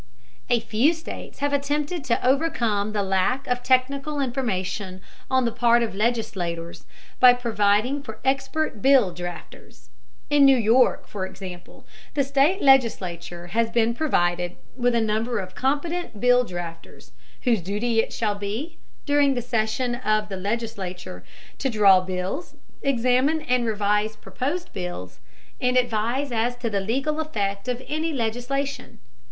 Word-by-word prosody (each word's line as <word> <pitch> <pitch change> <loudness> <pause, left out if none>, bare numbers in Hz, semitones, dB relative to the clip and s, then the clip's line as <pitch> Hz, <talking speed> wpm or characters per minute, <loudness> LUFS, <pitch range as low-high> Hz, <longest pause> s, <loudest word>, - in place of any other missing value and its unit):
A 240 -1 +4
few 240 +9 +2
states 320 -3 -9
have 285 0 0
attempted 290 +3 -1
to 240 0 0
overcome 245 -8 +1
the 210 -1 -1
lack 195 +8 0
of 250 0 -1
technical 275 +4 +1
information 200 -8 -2 0.3
on 260 -1 +2
the 230 - 0
part 235 0 +3
of 225 - -3
legislators 195 -7 -2 0.3
by 250 -1 +9
providing 225 +3 +1
for 220 -6 -8
expert 270 -2 -1
bill 260 -9 +5
drafters. 175 - -9 0.4
In 290 -1 +5
New 270 -1 +7
York, 235 +3 +3
for 190 -3 -4
example, 185 -2 -10 0.3
the 280 - +3
state 280 +8 +2
legislature 180 -10 +2
has 230 0 +2
been 230 0 +2
provided 175 - 0 0.2
with 245 -1 +1
a 230 - +3
number 220 +2 0
of 185 -2 -5
competent 290 - -2
bill 245 +1 +4
drafters 175 -3 -8 0.3
whose 230 -6 +2
duty 210 +6 0
it - - +1
shall 215 -2 -1
be, 205 +10 -5 0.3
during 285 -2 +3
the - - 0
session 240 +1 0
of 215 -3 0
the 195 - -4
legislature, 190 - -4 0.4
to 270 - 0
draw 200 -5 +6
bills, 185 - -4 0.3
examine 270 +4 +2
and 250 -3 +1
revise 210 0 0
proposed 260 - -4
bills, 175 - -6 0.4
and 250 0 +2
advise 245 +3 0
as 235 +1 0
to 240 -2 -4
the 200 -1 0
legal 270 +9 -1
effect 205 -9 -2
of 250 0 -2
any 315 +2 -1
legislation. 265 +2 -3
235 Hz, 145 wpm, -24 LUFS, 200-270 Hz, 0.4 s, by